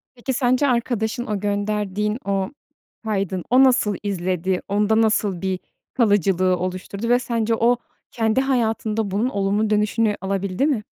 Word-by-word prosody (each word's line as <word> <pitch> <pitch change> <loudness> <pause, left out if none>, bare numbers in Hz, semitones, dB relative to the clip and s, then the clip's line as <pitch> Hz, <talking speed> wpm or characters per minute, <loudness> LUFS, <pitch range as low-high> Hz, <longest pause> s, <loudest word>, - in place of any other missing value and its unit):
Peki, 250 +2 -3
sence 255 +2 +2
arkadaşın 235 -1 -1
o 210 -3 -2
gönderdiğin 210 +1 -1
o 195 0 -1 0.5
kaydın, 195 -4 -2
o 255 +2 +6
nasıl 245 -6 +3
izledi? 185 -2 -1
Onda 210 +2 +2
nasıl 210 -4 +1
bir 190 -1 -1 0.4
kalıcılığı 195 - +2
oluşturdu 185 +4 -4
ve 245 +1 +5
sence 230 -2 -1
o 235 +2 +3 0.3
kendi 225 +1 +1
hayatında 225 -5 0
bunun 210 +6 0
olumlu 205 -1 0
dönüşünü 210 0 +1
alabildi 195 +4 -1
mi? 270 -8 0
210 Hz, 135 wpm, -22 LUFS, 195-235 Hz, 0.5 s, o